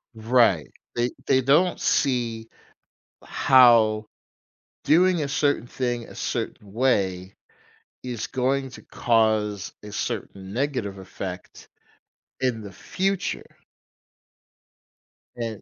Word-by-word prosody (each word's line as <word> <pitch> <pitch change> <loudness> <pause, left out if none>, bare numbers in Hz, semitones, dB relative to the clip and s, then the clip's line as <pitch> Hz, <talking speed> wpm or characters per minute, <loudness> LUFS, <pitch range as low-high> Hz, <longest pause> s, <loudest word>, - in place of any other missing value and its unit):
Right, 110 - +2 0.2
they 120 +1 0
they 130 -1 +3
don't 150 +8 +3
see 120 -4 0 0.8
how 115 -4 +5 0.8
doing 175 +1 +4
a 140 - -2
certain 145 -3 0
thing 120 -1 -3
a - - -13
certain 100 -2 -4
way 95 -7 0 0.7
is 125 -3 -4
going 135 +1 -1
to - - -12
cause 110 -3 0
a 105 0 -10
certain 100 -3 -5
negative 120 -6 -2
effect 95 -1 -8 0.7
in 125 -4 -1
the 100 -2 -9
future 190 - -3 1.8
and 115 -3 -5
120 Hz, 95 wpm, -24 LUFS, 105-130 Hz, 1.8 s, how